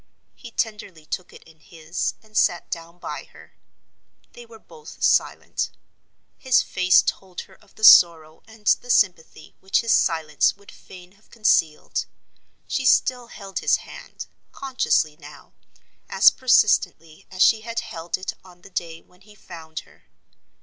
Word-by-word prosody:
He 240 - -12
tenderly 210 -8 -5
took 185 +3 -6
it - - -16
in 160 -1 -21
his, 160 +2 -5
and 215 -1 -22
sat 175 -4 +1
down 165 +1 -7
by - - -7
her. - - -18 0.8
They 240 -1 -13
were 225 -1 -14
both 455 - -13
silent. - - 0 0.7
His 260 -1 +3
face 185 0 +3
told 185 -2 -4
her 190 - -17
of 200 +1 -25
the 220 - -15
sorrow 160 -5 +6
and 220 -1 -18
the 245 - +2
sympathy 175 -8 0
which 190 - 0
his 230 - -1
silence 160 0 +1
would 200 0 -17
fain 180 -1 -15
have 200 +2 -28
concealed. 165 -8 0 0.6
She 265 - -3
still 250 -1 +2
held 195 -4 -7
his - - +2
hand—consciously 250 - -4
now—as 145 -2 -1
persistently 200 -10 +1
as 185 0 +1
she 220 -1 +4
had 230 +1 -4
held 170 -7 -5
it 185 - -5
on 180 -1 -19
the 195 - -15
day 165 -2 -5
when 180 +1 -27
he 210 +2 -19
found 160 -5 -10
her. - - -25
185 Hz, 150 wpm, -22 LUFS, 165-220 Hz, 0.8 s, sorrow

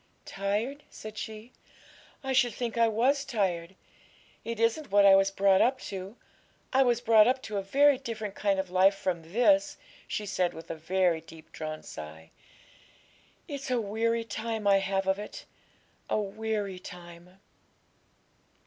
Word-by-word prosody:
'Tired?' 210 +9 -2
said 215 0 -10
she; 220 +3 -8 0.7
'I 265 0 -1
should 245 -4 +3
think 240 -2 -3
I 230 -1 +4
was 255 +6 +2
tired; 190 -8 -2 0.7
it 230 -1 -5
isn't 230 +6 +1
what 200 0 +5
I 195 -1 +8
was 195 0 +4
brought 195 -1 +3
up 260 +2 +2
to. 195 +2 -7 0.6
I 265 - +5
was 240 -3 +3
brought 225 -2 +6
up 260 +1 +2
to 210 -2 -4
a - - 0
very 275 +7 +4
different 220 -6 -5
kind 200 -2 0
of 190 -1 -3
life 190 +2 +5
from 170 -4 -3
this,' 290 - +3 0.3
she 210 - -3
said, 185 -3 -1
with 165 +1 -8
a - - -4
very 175 +1 +1
deep 160 0 -15
drawn 155 -1 -6
sigh. 80 +1 -10 1.2
'It's 280 -2 -6
a 250 -1 +1
weary 230 +2 0
time 220 0 -4
I 200 -1 +6
have 195 0 -1
of 190 +1 +1
it 210 - -8 0.6
a - - +1
weary 205 -2 -3
time.' 175 +1 -12
205 Hz, 160 wpm, -29 LUFS, 190-230 Hz, 1.2 s, I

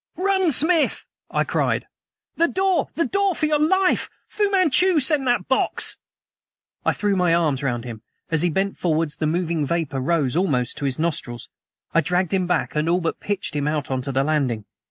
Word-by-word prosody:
"RUN, 380 -2 +2
SMITH!" 315 +4 +2 0.2
I - - +1
screamed. - - -1 0.5
"The 335 - +3
door! 380 0 +1
the 335 - +1
door, 395 -2 +1
for 310 - 0
your 300 -1 +1
life! 370 +5 +2 0.2
Fu 415 -1 0
Manchu 370 -2 +3
sent 280 0 +1
that 245 -1 +1
box!" 265 - +1 0.9
I - - +3
threw 205 -1 0
my 180 -3 +3
arms 150 -5 +1
round 120 -4 -2
him. 115 -3 -8 0.3
As 160 -2 +2
he 175 - +3
bent 195 +4 -1
forward 160 -2 0
the 155 - 0
moving 170 -1 0
vapor 145 -3 -2
rose 140 -2 0
almost 145 -10 0
to 145 - -3
his 135 -2 -1
nostrils. 145 -7 -3 0.4
I 165 - +4
dragged 180 +3 0
him 185 -2 +1
back 180 - 0
and 150 +2 0
all 175 +1 +3
but 165 -2 -3
pitched 200 -6 -3
him 145 0 -1
out 150 -2 -2
on 130 -1 -1
to 135 +2 -4
the 135 +1 +1
landing. 135 -8 0
170 Hz, 195 wpm, -22 LUFS, -, 0.9 s, I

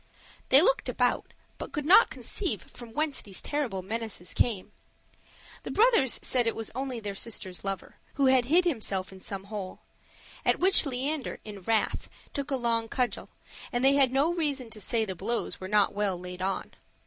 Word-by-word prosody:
They 275 +4 +8
looked - - +2
about, - - 0 0.3
but - - -6
could 295 -3 -3
not 390 +8 +7
conceive 355 - -1
from 240 -2 -11
whence 300 0 -1
these 195 -3 -4
terrible 255 -11 -2
menaces 220 -3 -4
came. 215 -6 0 0.9
The - - -7
brothers 440 - +4
said 245 -2 +3
it 230 - 0
was 225 - -4
only 260 -1 -3
their 205 -2 -5
sister's 195 -3 -3
lover, 195 -1 -5 0.2
who 275 - +2
had 260 -2 +4
hid 340 +7 +4
himself 210 - -1
in 190 - -12
some 195 0 -4
hole; 200 -2 -7 0.6
at - - +3
which 370 -4 +5
Leander, 275 +2 -3
in 205 -2 -8
wrath, 220 +3 0 0.2
took 280 0 -3
a 275 - +1
long 230 -2 0
cudgel, 250 -2 -2 0.4
and 245 +1 0
they 275 - +6
had 275 -3 +4
no 285 +6 +2
reason 285 -8 -2
to 215 - -6
say 225 +3 +1
the 190 - -4
blows 230 +5 -3
were 185 - -4
not 205 0 +3
well 200 -3 -1
laid 180 0 -8
on. 190 +1 -2
235 Hz, 185 wpm, -28 LUFS, 200-275 Hz, 0.9 s, They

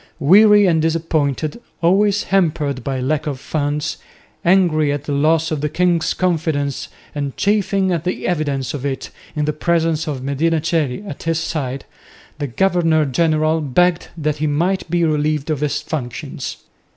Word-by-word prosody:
Weary 205 +6 +6
and 165 -4 +3
disappointed, 160 - -1 0.2
always 200 +3 +3
hampered 150 -8 0
by 135 0 -2
lack 145 +4 -1
of 140 -3 -3
funds, 145 +1 -2 0.5
angry 170 -5 +3
at 145 -1 -3
the 145 - -5
loss 155 +3 +2
of 155 -2 -2
the 150 - 0
king's 175 +1 +1
confidence 160 -6 -1 0.3
and 140 -2 -4
chafing 200 -2 +1
at 170 -3 -1
the 180 +1 -3
evidence 145 -6 -1
of 140 -3 -5
it 135 -2 -3 0.2
in 150 -1 0
the 150 - 0
presence 165 0 0
of 135 -4 -4
Medina 155 +4 +1
Coeli 160 +2 -1
at 145 - -7
his 165 -1 0
side, 140 -5 -3 0.5
the 145 - -2
governor 165 +1 +2
general 155 +2 +1
begged 175 +5 +2
that 150 -1 -1
he 155 +1 -1
might 175 +5 0
be 175 0 +1
relieved 150 -1 0
of 150 - -1
his 150 -1 -1
functions. 125 -6 -5
155 Hz, 160 wpm, -19 LUFS, 145-170 Hz, 0.5 s, Weary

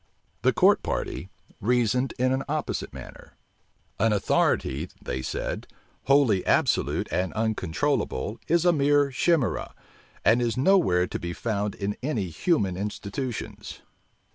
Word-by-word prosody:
The - - +4
court - - +4
party - - -3 0.3
reasoned 125 +3 +1
in 130 +1 +2
an 135 - 0
opposite 155 +1 -2
manner. - - -11 0.7
An 115 +1 +3
authority, 85 -5 +1
they 65 +1 -4
said, - - -4 0.4
wholly 135 -9 +4
absolute - - +2
and 90 0 0
uncontrollable 110 - -1
is 170 +1 +2
a 175 - +5
mere 145 -1 +3
chimera, 145 -1 0 0.5
and 115 +5 +5
is 120 0 0
nowhere 130 - +4
to - - -5
be 85 0 -4
found 105 -1 -2
in 100 0 -3
any 120 - -2
human 95 - 0
institutions. 105 +4 -5
115 Hz, 125 wpm, -26 LUFS, 100-140 Hz, 0.7 s, a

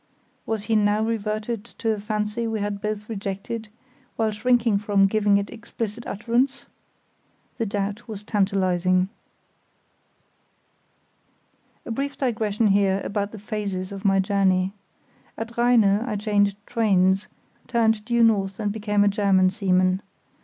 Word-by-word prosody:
Was 220 -2 -2
he 225 +1 0
now 210 0 +3
reverting 220 0 -2
to 230 0 -3
a 215 - -2
fancy 210 +2 -2
we 225 -1 -2
had 205 -1 -3
both 210 -1 -3
rejected, 210 +1 -5 0.5
while 220 -1 +1
shrinking 230 -1 +2
from 200 -1 +3
giving 205 0 +3
it 200 0 -3
explicit 230 0 -6
utterance? 240 +6 0 0.9
The 225 - 0
doubt 205 +4 -3
was 210 -2 -7
tantalising. 185 -3 +1 2.8
A - - -5
brief 280 +4 -3
digression 220 -4 +1
here 195 -1 +3
about 205 0 -2
the 220 - -9
phases 200 -3 -4
of 195 0 -7
my 195 -1 +3
journey. 190 -1 +2 0.6
At 230 +1 -6
Rheine 240 -1 +4
I 210 +3 +1
changed 205 -1 +1
trains, 195 -4 +2 0.4
turned 225 -2 +2
due 235 +1 +2
north 195 -3 +2
and 210 -2 -1
became 210 -1 +1
a - - +3
German 195 -2 +3
seaman. 185 -1 +2
210 Hz, 130 wpm, -24 LUFS, 195-225 Hz, 2.8 s, Rheine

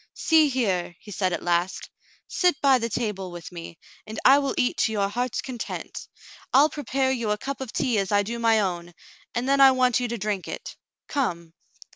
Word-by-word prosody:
"See 315 -2 +4
here," 190 -10 -1
he 210 - -12
said 185 -1 -1
at 170 - -3
last, 175 +1 -1 0.4
"sit 355 -6 +1
by 270 -2 +4
the 230 0 -2
table 210 -5 -3
with 175 0 -9
me, 165 -1 -9 0.3
and 215 0 -6
I 275 +2 +8
will 275 -1 -2
eat 250 - +1
to 220 - +1
your 200 -2 0
heart's 245 +4 -2
content. 250 -3 -6 0.4
I'll 285 +4 +5
prepare 270 -2 -1
you 235 -4 -2
a 210 - +1
cup 275 +5 -5
of 260 -4 -5
tea 245 -6 0
as 195 0 -2
I 205 0 +3
do 235 +3 -5
my 225 -1 +3
own, 175 -3 -4 0.4
and 240 +2 -1
then 275 0 +3
I 270 - +9
want 255 -2 +2
you 245 - -1
to 235 0 -4
drink 205 -2 -3
it. - - -7 0.3
Come." 170 - -2
230 Hz, 205 wpm, -25 LUFS, 190-265 Hz, 0.4 s, I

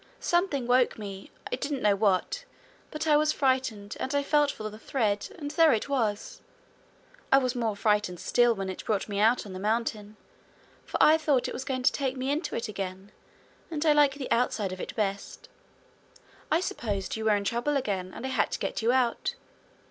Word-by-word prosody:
Something 345 -7 +1
woke 245 +1 +3
me 200 -2 -8 0.2
I - - 0
didn't 280 -3 -3
know 205 -1 +4
what, 200 - +1 0.5
but 305 +1 -4
I 305 -2 +4
was 305 0 +3
frightened, 260 -8 0
and 265 +2 -2
I 285 - +2
felt 295 0 +3
for 215 -5 -5
the 215 0 -9
thread, 215 -4 -1
and 290 -3 -5
there 320 0 +5
it 225 +5 -2
was! 240 - -1 0.9
I 270 - +8
was 255 -2 +1
more 230 -4 -1
frightened 210 -4 +1
still 240 -1 +3
when 195 -1 -4
it 185 - -6
brought 210 -3 -1
me 200 -2 -3
out 225 +3 +3
on 195 - -8
the 185 - -6
mountain, 215 0 -2 0.7
for - - -2
I 315 +1 +6
thought 290 -5 +1
it - - -5
was - - -4
going 255 -1 -2
to 265 - +5
take 270 -2 -2
me 260 +2 -1
into 300 +1 -2
it 230 +1 -2
again, 195 -1 -6 0.6
and 320 -1 -3
I 305 - +6
like 290 -2 +4
the 280 -3 -6
outside 225 -5 +1
of 185 - -6
it - - -6
best. 205 - -3 1.0
I 320 - +2
supposed 205 - -3
you 220 0 -4
were 215 -1 +4
in 200 - -1
trouble 240 +7 0
again, 190 -7 -2
and 260 - -7
I - - -2
had 255 -6 +1
to - - 0
get - - -3
you 230 +2 +3
out. 255 - +1
240 Hz, 205 wpm, -28 LUFS, 205-280 Hz, 1.0 s, I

